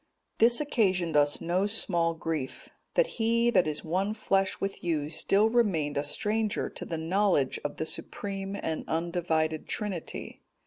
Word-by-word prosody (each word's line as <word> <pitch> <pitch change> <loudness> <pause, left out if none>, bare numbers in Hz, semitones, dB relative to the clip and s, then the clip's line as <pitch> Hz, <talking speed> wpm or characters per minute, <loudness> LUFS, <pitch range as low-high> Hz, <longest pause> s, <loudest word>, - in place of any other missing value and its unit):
This 235 +1 +5
occasioned 190 - +1
us 145 0 +3
no 180 +4 +1
small 170 -6 +1
grief, 160 -5 -4 0.3
that - - +5 0.2
he 235 +1 +3
that 185 -7 +4
is 150 -1 -3
one 190 +6 -1
flesh 195 -3 +1
with 195 0 -3
you 155 -3 -1
still 200 +6 +3
remained 200 -11 +1
a 145 - 0
stranger 210 +8 -1
to - - -7
the 165 - -3
knowledge 170 -4 +1
of 145 - -4
the 160 - -2
supreme 195 +3 -4
and 160 -5 -3
undivided 160 -2 -1
Trinity. 200 -7 -4
180 Hz, 150 wpm, -29 LUFS, 160-210 Hz, 0.3 s, This